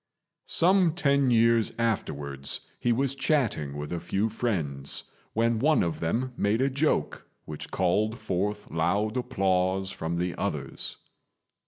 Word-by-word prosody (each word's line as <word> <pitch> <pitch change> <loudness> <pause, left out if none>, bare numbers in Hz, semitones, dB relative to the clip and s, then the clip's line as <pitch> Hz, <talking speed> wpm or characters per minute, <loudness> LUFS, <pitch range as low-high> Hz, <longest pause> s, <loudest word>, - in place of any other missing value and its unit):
Some 180 -2 +4
ten 140 -6 +3
years 115 -1 +4
afterwards 70 - -2 0.2
he 120 - +1
was 135 +3 +1
chatting 125 - 0
with 75 +3 -5
a 85 - -2
few 95 +6 0
friends, 80 - -2 0.3
when 115 0 +2
one 155 +5 +4
of 85 -2 -2
them 120 +10 -1
made 105 +1 +1
a 135 +1 +2
joke 145 +4 0 0.2
which 75 -1 -7
called 105 +5 +1
forth 105 0 -2
loud 100 +7 +1
applause 95 -6 +1
from 80 +1 -3
the 90 0 -1
others. - - -3
105 Hz, 135 wpm, -27 LUFS, 85-125 Hz, 0.3 s, Some